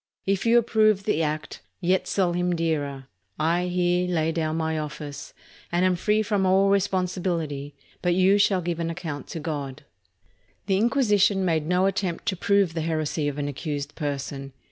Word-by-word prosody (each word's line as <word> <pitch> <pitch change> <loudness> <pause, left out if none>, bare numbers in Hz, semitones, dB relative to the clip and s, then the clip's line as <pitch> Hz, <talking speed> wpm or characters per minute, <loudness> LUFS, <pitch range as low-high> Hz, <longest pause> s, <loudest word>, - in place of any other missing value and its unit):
If 195 +3 0
you 235 +1 +6
approve 215 -3 +3
the 180 -6 +1
act, 155 0 -3 0.2
yet 185 +1 +1
sell 185 -3 +1
Him 180 0 0
dearer, 145 -5 -2 0.3
I 170 +3 +1
here 180 0 +1
lay 165 -2 +1
down 160 -1 -1
my 160 -1 -1
office, 150 -1 -7 0.4
and 175 +2 +2
am 185 -1 +3
free 210 +4 +1
from 205 -2 0
all 190 +1 +4
responsibility; 180 -7 -1 0.3
but 175 -1 +2
you 190 +2 +4
shall 195 -2 +3
give 170 -1 -3
an 165 0 -1
account 165 -4 -5
to 165 - -6
God." 145 -3 -5 0.8
The 190 -1 +2
Inquisition 210 -5 +3
made 160 -3 0
no 180 +2 +2
attempt 195 -3 -1
to 190 - -1
prove 200 -1 +2
the 165 - -2
heresy 155 -1 -1
of 145 -1 -3
an 145 -1 -2
accused 145 0 -4
person. 140 -2 -4
175 Hz, 170 wpm, -25 LUFS, 155-190 Hz, 0.8 s, you